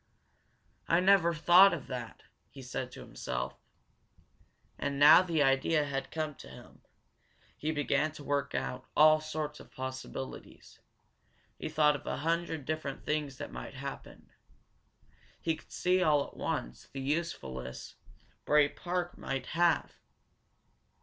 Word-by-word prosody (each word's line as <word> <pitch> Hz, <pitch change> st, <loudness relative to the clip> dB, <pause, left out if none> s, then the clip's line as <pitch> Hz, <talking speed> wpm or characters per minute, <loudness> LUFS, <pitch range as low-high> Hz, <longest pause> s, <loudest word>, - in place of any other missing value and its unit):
"I 170 Hz, -, +4 dB
never 185 Hz, -2 st, +5 dB
thought 175 Hz, +3 st, +6 dB
of 140 Hz, -, -8 dB
that!" 125 Hz, -3 st, -7 dB, 0.3 s
he 135 Hz, -, -11 dB
said 125 Hz, 0 st, -5 dB
to -, -, -9 dB
himself. 60 Hz, 0 st, -5 dB, 1.2 s
And 140 Hz, -1 st, -2 dB
now 150 Hz, +5 st, +9 dB
that 185 Hz, -, -6 dB
the 160 Hz, -4 st, +2 dB
idea 140 Hz, +3 st, +2 dB
had 135 Hz, -1 st, -3 dB
come 155 Hz, -1 st, -3 dB
to -, -, -12 dB
him, 65 Hz, -, -14 dB, 0.7 s
he 155 Hz, -, -2 dB
began 150 Hz, +1 st, +1 dB
to 150 Hz, -, -10 dB
work 140 Hz, -2 st, -1 dB
out 125 Hz, 0 st, -3 dB
all 155 Hz, 0 st, +7 dB
sorts 155 Hz, -1 st, -4 dB
of -, -, -14 dB
possibilities. 130 Hz, 0 st, -8 dB, 0.8 s
He -, -, -4 dB
thought 150 Hz, -1 st, +3 dB
of 145 Hz, -, -9 dB
a -, -, -2 dB
hundred 165 Hz, -3 st, -1 dB
different 155 Hz, -2 st, -4 dB
things 150 Hz, -3 st, -2 dB
that 145 Hz, -, -7 dB
might -, -, -8 dB
happen. 140 Hz, +1 st, -8 dB, 1.1 s
He 165 Hz, -1 st, 0 dB
could -, -, -18 dB
see, 185 Hz, +1 st, +1 dB
all 150 Hz, -4 st, +3 dB
at -, -, -14 dB
once, -, -, -4 dB
the 135 Hz, -, -6 dB
usefulness 130 Hz, -, -4 dB, 0.5 s
Bray 150 Hz, -1 st, +4 dB
Park 175 Hz, +1 st, -4 dB
might 135 Hz, -1 st, -3 dB
have. 170 Hz, -1 st, +2 dB
150 Hz, 140 wpm, -31 LUFS, 135-160 Hz, 1.2 s, now